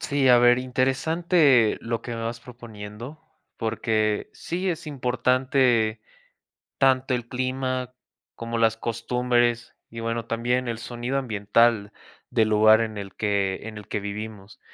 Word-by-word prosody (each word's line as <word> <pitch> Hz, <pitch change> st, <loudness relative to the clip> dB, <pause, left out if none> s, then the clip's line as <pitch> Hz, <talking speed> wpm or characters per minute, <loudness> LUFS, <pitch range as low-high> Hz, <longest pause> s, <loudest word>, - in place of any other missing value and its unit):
Sí, 140 Hz, -2 st, +1 dB
a 125 Hz, -1 st, +7 dB
ver, 120 Hz, 0 st, +5 dB
interesante 135 Hz, -, +2 dB
lo 115 Hz, -1 st, -3 dB
que 120 Hz, -, -7 dB
me 115 Hz, -, -5 dB
vas 115 Hz, +1 st, -4 dB
proponiendo, 115 Hz, +2 st, -10 dB, 0.4 s
porque 110 Hz, -2 st, -1 dB
sí 180 Hz, +3 st, -4 dB
es 165 Hz, -1 st, -5 dB
importante, 125 Hz, -4 st, +1 dB, 0.8 s
tanto 130 Hz, 0 st, +3 dB
el 120 Hz, -1 st, -4 dB
clima, 130 Hz, 0 st, -2 dB, 0.4 s
como 115 Hz, 0 st, -4 dB
las 115 Hz, -1 st, +3 dB
costumbres 120 Hz, +1 st, 0 dB
y, 115 Hz, -, -8 dB
bueno, 115 Hz, 0 st, -3 dB
también 120 Hz, +2 st, -1 dB
el 115 Hz, -1 st, -3 dB
sonido 120 Hz, +3 st, -4 dB
ambiental, 110 Hz, -2 st, +1 dB, 0.4 s
del 110 Hz, -1 st, +2 dB
lugar 110 Hz, +1 st, +5 dB
en 110 Hz, -2 st, -3 dB
el 100 Hz, -1 st, -8 dB
que 100 Hz, -2 st, -1 dB
en 110 Hz, -1 st, -8 dB
el 105 Hz, -, -12 dB
que 105 Hz, -, -3 dB
vivimos. 105 Hz, 0 st, -7 dB
120 Hz, 140 wpm, -24 LUFS, 110-130 Hz, 0.8 s, a